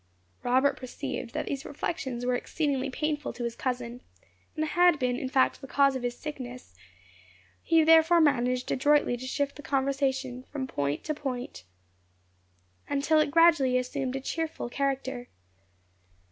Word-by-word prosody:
Robert 260 +3 +2
perceived 250 -1 -6
that - - -1
these 275 -1 -4
reflections 265 -5 -4
were 250 - +1
exceedingly 275 +1 -1
painful 300 +2 -2
to 245 - -6
his 235 -1 -3
cousin, 245 -1 -3 0.5
and 310 - 0
had 350 +1 +4
been 250 -2 0
in 260 +1 -4
fact 260 0 +2
the 270 - -8
cause 275 0 +3
of 260 - -3
his 245 0 -3
sickness; 255 - -8 0.9
he 325 -1 +4
therefore 325 +2 +6
managed 255 -4 +2
adroitly 290 -1 +3
to 255 +2 -7
shift 280 +1 -2
the - - -8
conversation 270 -2 -1
from 280 -3 -3
point 145 - -2
to 305 - -2
point, 255 - -5 1.2
until 290 +2 +2
it 305 - +2
gradually 295 -5 +5
assumed 255 +1 -2
a 270 - -3
cheerful 320 -2 -3
character. 265 -2 -2
270 Hz, 145 wpm, -28 LUFS, 250-295 Hz, 1.2 s, therefore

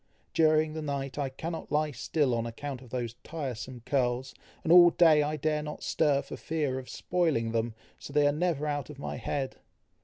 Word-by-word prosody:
During 155 -1 +3
the 160 - -4
night, 140 -2 -3
I 140 -2 0
cannot 160 +5 -6
lie 150 0 +1
still 140 +1 0
on 115 0 -1
account 130 +3 -6
of 125 - -13
those 120 -2 -3
tiresome 130 -5 -5
curls, 130 -1 0 0.3
and 160 - +1
all 175 -1 +10
day 165 -3 +5
I 150 +1 -1
dare 150 +1 0
not 150 0 -7
stir 145 -3 +2
for - - -8
fear 150 -5 -1
of 130 - -10
spoiling 160 -11 0
them, 115 0 -1 0.2
so - - -9
they 145 0 +3
are 145 - +5
never 155 -1 0
out 145 -2 -2
of 150 - -9
my 140 - -5
head." 135 -2 -3
145 Hz, 195 wpm, -29 LUFS, 130-155 Hz, 0.3 s, all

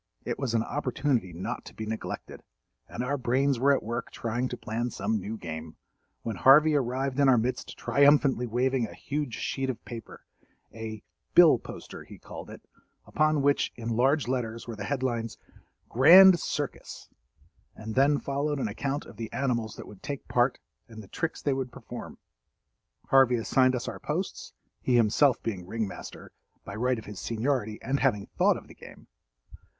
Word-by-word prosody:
It - - -3
was 130 -4 -1
an 115 - +2
opportunity 125 -6 -1
not 85 +2 -5
to - - -12
be 110 - -5
neglected, 110 +1 -6 0.5
and 120 - -4
our 140 +2 -1
brains 130 +1 +1
were 140 +3 +4
at 140 - +2
work 115 +2 -4
trying 120 +2 -2
to 125 - -5
plan 115 +3 -3
some 110 -1 -1
new 105 +4 -5
game, 80 -3 -7 0.5
when 115 -4 -4
Harvey 150 +8 +6
arrived 135 0 -1
in 140 -1 +5
our 125 - +6
midst 120 +3 -2
triumphantly 140 -3 +3
waving 125 +1 0
a 85 - -12
huge 140 +6 -3
sheet 135 -1 -2
of 125 - -5
paper—a 110 -1 -10 0.3
"bill 165 -8 +8
poster" - - -10
he - - -13
called - - -10
it—upon 155 -2 -3
which, 140 0 +2
in 115 -1 -5
large 130 +5 +2
letters, 115 -3 -3
were 115 - -5
the 100 -1 -6
headlines, 120 -4 -2 0.5
"Grand 175 +8 +8
Circus," - - -5 0.7
and 110 0 -7
then 140 +3 +4
followed 145 +2 -2
an 135 - -1
account 140 +7 -3
of - - -13
the 115 -1 -6
animals 120 -5 -1
that - - -9
would 100 -3 -13
take 140 -2 -6
part 125 +1 +2 0.3
and 110 -2 -10
the - - -14
tricks 165 +9 -4
they 140 - +2
would 130 -2 -3
perform. - - -9 0.9
Harvey 135 -2 +5
assigned 130 +2 +2
us 120 - -4
our - - -5
posts—he 125 - -4
himself 120 +3 +3
being 95 -6 -4
ring 110 +1 -2
master, - - -10 0.3
by 100 - -7
right 125 +4 0
of 110 - -9
his 105 -2 -8
seniority 115 -2 -1
and 140 +1 0
having 105 -7 +1
thought - - +3
of - - -12
the - - -13
game. - - -14
125 Hz, 170 wpm, -28 LUFS, 110-140 Hz, 0.9 s, bill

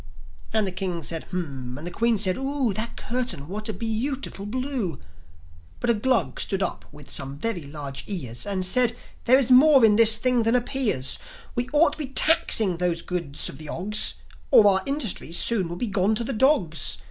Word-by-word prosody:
And 220 -1 +1
the 190 - -3
King 180 -2 -4
said, 165 -1 -4
"Hum," 135 -9 -6
and 150 - -9
the 175 - -5
Queen 230 +4 +1
said, 190 -2 +2
"Oo! 270 -4 -2
That 220 +4 -3
curtain! 240 - -4
What 215 +4 -5
a - - -2
bee 225 +4 -2
ootiful 260 -7 -4
blue!" 255 - -3 0.8
But 240 - +1
a - - +3
Glug 235 +3 0
stood 195 -1 -2
up - - -4
with 145 -1 -14
some 135 +1 -1
very 225 +1 -3
large 140 -2 -7
ears, 125 - -4
And 190 -2 -1
said, 240 +4 +2 0.3
"There 255 +2 +6
is 265 -2 +1
more 270 -1 +7
in 210 -1 +4
this 225 -1 +8
thing 250 +1 +2
than 230 +2 +2
appears! 240 - 0
And - - -18
we 245 +1 -2
ought 300 +1 +4
to - - -9
be 295 - -4
taxing 225 - +2
those 175 -1 -1
goods 170 -6 -3
of 135 - -10
the 155 -1 -9
Ogs, 210 +4 +2 0.3
Or 215 - +6
our 190 -2 +5
industries 235 - -1
soon 200 -7 +1
will 170 - -5
be 210 - -3
gone 200 0 0
to 235 - -2
the 265 - -3
dogs." 210 - +2
210 Hz, 205 wpm, -24 LUFS, 175-245 Hz, 0.8 s, this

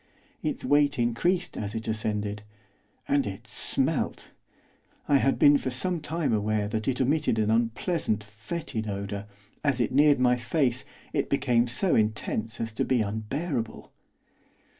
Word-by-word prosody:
Its - - -2
weight 145 0 +3
increased 120 +10 0
as 105 +1 -4
it 115 0 -4
ascended, 105 -1 -2 0.7
and 140 -4 +2
it 95 -1 -7
smelt! - - -1 0.8
I 145 - +5
had 135 0 +2
been 145 -1 +6
for - - -2
some 170 +8 +1
time 155 -3 -1
aware 105 0 0
that 110 0 -3
it 130 - 0
emitted 140 -2 +2
an 110 0 +2
unpleasant, 115 - 0
foetid 110 +2 -5
odour; 100 0 -4 0.4
as 140 -4 +1
it 120 - +1
neared 145 +1 +5
my 125 -1 +4
face 125 0 0 0.3
it - - 0
became 125 -4 +2
so 145 +10 +1
intense 110 0 0
as 115 0 -2
to 110 - -1
be 130 -3 +2
unbearable. 115 - -3
120 Hz, 145 wpm, -27 LUFS, 110-140 Hz, 0.8 s, been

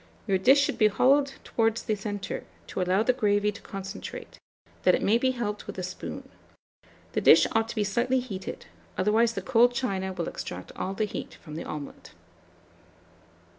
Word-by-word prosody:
Your 195 -3 +1
dish 265 +9 +6
should 280 - 0
be 215 - +6
hollowed 275 +6 +3
towards 225 0 0
the 220 - 0
centre, 205 -1 -4 0.2
to - - -4
allow 185 +3 +2
the 255 +2 +3
gravy 210 -4 +2
to 210 - -12
concentrate, 195 0 -8 0.4
that - - +5
it - - -3
may 225 +4 +4
be 260 - +2
helped 225 -5 -3
with - - -7
a 185 - -3
spoon. 180 - -6 0.8
The - - -1
dish - - +7
ought 225 0 +1
to - - -5
be 215 - +1
slightly 240 +6 +1
heated, 200 -7 -6 0.3
otherwise 220 +4 +3
the - - -4
cold 245 0 +4
china 190 -7 -1
will 175 -3 -4
extract 90 +1 -6
all 190 +1 -3
the 215 - +1
heat 205 - -6
from 155 - -10
the 160 - -5
omelet. 150 -2 -8
210 Hz, 180 wpm, -27 LUFS, 195-240 Hz, 0.8 s, dish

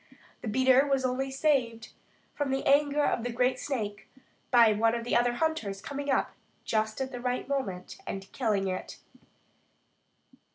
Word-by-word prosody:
The - - -6
beater 260 +4 +4
was 270 -2 +1
only 260 +1 -1
saved 260 -5 0 0.4
from 290 -2 -2
the 270 0 -1
anger 290 +1 +3
of 230 - 0
the 245 - -2
great 250 +2 +1
snake 210 -7 -4 0.4
by 235 -3 +6
one 225 +2 +2
of 235 - -3
the 240 - -1
other 240 0 +3
hunters 240 -9 -1
coming 285 +6 -5
up 270 - +1 0.3
just 215 0 -1
at 265 0 -3
the 245 -2 -6
right 250 0 -2
moment 205 -11 -4
and 195 0 -5
killing 210 -6 0
it. 185 0 -5
250 Hz, 160 wpm, -29 LUFS, 220-270 Hz, 0.4 s, by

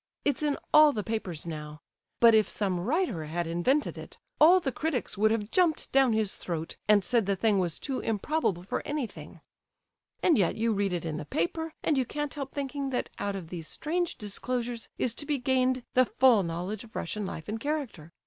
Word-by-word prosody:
It's 285 -1 +1
in 295 -2 +1 0.2
all 305 -1 +8
the 210 - -2
papers 195 -8 -4
now. 150 -2 -6 0.4
But 230 -1 +7
if 215 -1 +4
some 190 -4 -1
writer 235 - 0
had 170 +3 -2
invented 175 - 0
it, - - -11 0.2
all 345 +5 +8
the 275 -7 -2
critics 305 -6 -2
would 215 +2 +3
have 220 -1 -1
jumped 350 -4 +2
down 265 -3 +4
his 215 -3 0
throat 165 -2 -5
and 210 -2 +5
said 230 -3 +2
the 200 - +2
thing 205 +1 +2
was 175 -3 0
too 270 -2 -3
improbable 220 - -1
for 185 - -3
anything. 200 - -5 0.8
And 325 -9 +4
yet 180 - +2
you 225 0 +1
read 200 -1 0
it 175 -2 -2
in 155 -2 -3
the 150 - -5
paper, 315 - -2
and 290 -4 +2
you 255 - +1
can't 295 -1 -3
help 275 -3 -5
thinking 280 -1 -3
that 250 - -2
out 200 -1 -2
of 180 -4 -7
these 165 -3 -6
strange 345 - -2
disclosures 235 +2 -3
is 240 - 0
to 290 - -8
be 295 - +1
gained 255 0 +1
the 255 0 +5
full 250 -4 +4
knowledge 180 +4 -4
of 225 - -16
Russian 205 +3 -3
life 160 - -7
and 215 +2 -3
character. 255 - -4
225 Hz, 205 wpm, -28 LUFS, 180-275 Hz, 0.8 s, all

